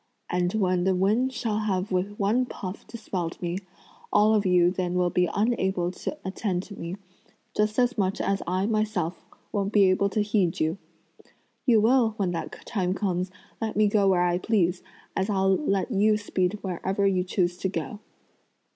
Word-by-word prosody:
And 180 Hz, 0 st, +1 dB
when 185 Hz, -4 st, +1 dB
the 190 Hz, 0 st, +2 dB
wind 215 Hz, +8 st, +2 dB
shall 225 Hz, -4 st, -2 dB
have 195 Hz, -2 st, -1 dB
with 190 Hz, +3 st, -1 dB
one 225 Hz, +5 st, +1 dB
puff 190 Hz, -4 st, -7 dB
dispelled 185 Hz, -7 st, -4 dB
me, 175 Hz, +1 st, -2 dB, 0.5 s
all 210 Hz, +1 st, +5 dB
of 210 Hz, -2 st, +2 dB
you 180 Hz, -1 st, +4 dB
then 180 Hz, -1 st, -2 dB
will 180 Hz, -1 st, +2 dB
be 180 Hz, -1 st, +2 dB
unable 190 Hz, -5 st, 0 dB
to 295 Hz, -, -5 dB
attend 190 Hz, -1 st, -2 dB
to 200 Hz, -, -10 dB
me, 170 Hz, +1 st, -5 dB, 0.6 s
just 210 Hz, 0 st, +1 dB
as 245 Hz, -2 st, +2 dB
much 190 Hz, 0 st, 0 dB
as 195 Hz, 0 st, 0 dB
I 185 Hz, +2 st, 0 dB
myself 215 Hz, -6 st, -1 dB, 0.3 s
won't 200 Hz, -1 st, -1 dB
be 200 Hz, -3 st, +5 dB
able 200 Hz, +2 st, +2 dB
to 210 Hz, +1 st, 0 dB
heed 205 Hz, -5 st, +1 dB
you. 160 Hz, +5 st, 0 dB, 0.9 s
You 230 Hz, -4 st, +5 dB
will, 230 Hz, -1 st, +3 dB
when 190 Hz, -3 st, 0 dB
that 165 Hz, -2 st, -6 dB
time 185 Hz, -5 st, -1 dB
comes, 185 Hz, -3 st, -1 dB, 0.3 s
let 220 Hz, -1 st, -2 dB
me 215 Hz, +1 st, +4 dB
go 205 Hz, -1 st, +3 dB
where 180 Hz, -2 st, +3 dB
I 175 Hz, 0 st, +1 dB
please, 180 Hz, -4 st, +1 dB, 0.3 s
as 190 Hz, +2 st, 0 dB
I'll 195 Hz, -1 st, +3 dB
let 200 Hz, -4 st, 0 dB
you 210 Hz, +1 st, +3 dB
speed 200 Hz, -1 st, -1 dB
where 185 Hz, -3 st, -4 dB, 0.2 s
you 185 Hz, -2 st, +2 dB
choose 180 Hz, -1 st, 0 dB
to 190 Hz, -, -1 dB
go!" 205 Hz, +2 st, -4 dB
195 Hz, 180 wpm, -26 LUFS, 180-215 Hz, 0.9 s, all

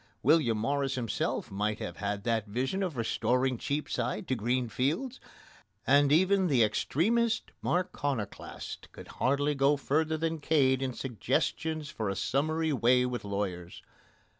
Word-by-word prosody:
William 140 Hz, -6 st, +4 dB
Morris 135 Hz, +4 st, 0 dB
himself 120 Hz, -3 st, -2 dB
might 105 Hz, +2 st, -1 dB
have 85 Hz, -5 st, -6 dB
had 100 Hz, 0 st, -3 dB
that 115 Hz, -2 st, 0 dB
vision 130 Hz, -, -1 dB
of 180 Hz, -8 st, -2 dB
restoring 125 Hz, +3 st, +1 dB
Cheapside 130 Hz, -6 st, -2 dB
to -, -, 0 dB
green 120 Hz, +2 st, 0 dB
fields, 165 Hz, -, -1 dB, 0.7 s
and 140 Hz, +1 st, +4 dB
even 190 Hz, +4 st, +4 dB
the 130 Hz, -7 st, +4 dB
extremest 220 Hz, -, +1 dB
Marconoclast 145 Hz, -, -3 dB
could -, -, -11 dB
hardly 140 Hz, +3 st, +1 dB
go 140 Hz, +1 st, +3 dB
further 155 Hz, +3 st, 0 dB
than 165 Hz, 0 st, -2 dB
Cade 135 Hz, -4 st, +2 dB
in 130 Hz, -1 st, -2 dB
suggestions 150 Hz, +5 st, -2 dB
for 110 Hz, -7 st, -3 dB
a 100 Hz, -, -2 dB
summary 155 Hz, +7 st, 0 dB
way 125 Hz, 0 st, +4 dB
with 125 Hz, -1 st, -3 dB
lawyers. 100 Hz, -4 st, -4 dB
135 Hz, 140 wpm, -30 LUFS, 115-155 Hz, 0.7 s, William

